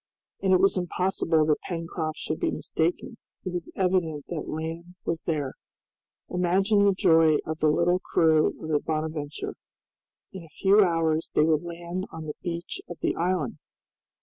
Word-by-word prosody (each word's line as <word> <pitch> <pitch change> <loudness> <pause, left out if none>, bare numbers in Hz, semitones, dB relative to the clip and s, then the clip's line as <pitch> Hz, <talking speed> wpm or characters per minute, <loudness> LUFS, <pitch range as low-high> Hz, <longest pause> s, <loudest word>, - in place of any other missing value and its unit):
And 190 - +2
it 185 - +6
was 195 0 +3
impossible 175 -3 +1
that 150 -1 +1
Pencroft 165 -2 -3
should 155 - -3
be - - +1
mistaken, 175 +8 -2 0.3
it 185 - -3
was 175 -2 -4
evident 180 -6 0
that 170 -3 -4
land 165 +3 -5
was 165 -1 -1
there. 150 -5 -1 0.8
Imagine 195 +4 +3
the 200 -1 +4
joy 165 -4 +5
of 160 0 -4
the 155 - +3
little 175 +4 +3
crew 160 -4 +3 0.2
of 160 - -5
the 150 -2 +3
"Bonadventure." 155 -2 -3 0.8
In 190 -2 -7
a 165 - -15
few 200 +2 +5
hours 165 -3 +1
they 150 - +5
would 155 -1 +3
land 175 +2 -5
on 160 -1 -7
the 150 - -4
beach 170 0 -4
of 175 - -7
the - - 0
island! 175 -6 -1
165 Hz, 165 wpm, -26 LUFS, 155-180 Hz, 0.8 s, it